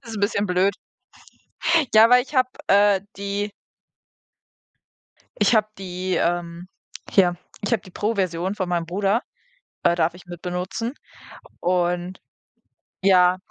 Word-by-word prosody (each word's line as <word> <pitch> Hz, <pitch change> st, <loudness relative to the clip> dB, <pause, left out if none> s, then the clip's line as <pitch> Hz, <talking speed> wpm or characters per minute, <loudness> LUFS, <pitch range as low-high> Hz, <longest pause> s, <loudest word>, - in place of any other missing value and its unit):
ist 230 Hz, -2 st, -8 dB
'n 205 Hz, -, -4 dB
bisschen 200 Hz, 0 st, +1 dB
blöd. 185 Hz, +2 st, +2 dB, 1.2 s
Ja, 225 Hz, +2 st, +7 dB
weil 250 Hz, 0 st, +6 dB
ich 275 Hz, -, -13 dB
habe, 255 Hz, -1 st, +3 dB, 0.2 s
äh, 200 Hz, -1 st, +5 dB, 0.2 s
die 200 Hz, +1 st, -3 dB, 1.9 s
Ich 240 Hz, -, +3 dB
hab 215 Hz, 0 st, +1 dB
die, 185 Hz, -1 st, -3 dB
ähm 170 Hz, 0 st, -2 dB, 0.4 s
hier, 180 Hz, -3 st, +3 dB, 0.3 s
ich 205 Hz, -, -3 dB
habe 225 Hz, -, +1 dB
die 185 Hz, -, -14 dB
Pro 210 Hz, +5 st, -1 dB
Version 185 Hz, -1 st, -1 dB
von 185 Hz, -3 st, -3 dB
meinem 170 Hz, -2 st, -1 dB
Bruder 200 Hz, +6 st, 0 dB, 0.6 s
äh, 170 Hz, -, +4 dB
darf 165 Hz, 0 st, +1 dB
ich 180 Hz, -, -15 dB
mitbenutzen 180 Hz, -, -4 dB, 0.7 s
und 180 Hz, +1 st, -1 dB, 0.8 s
ja 185 Hz, -1 st, +5 dB
190 Hz, 130 wpm, -23 LUFS, 180-205 Hz, 1.9 s, Ja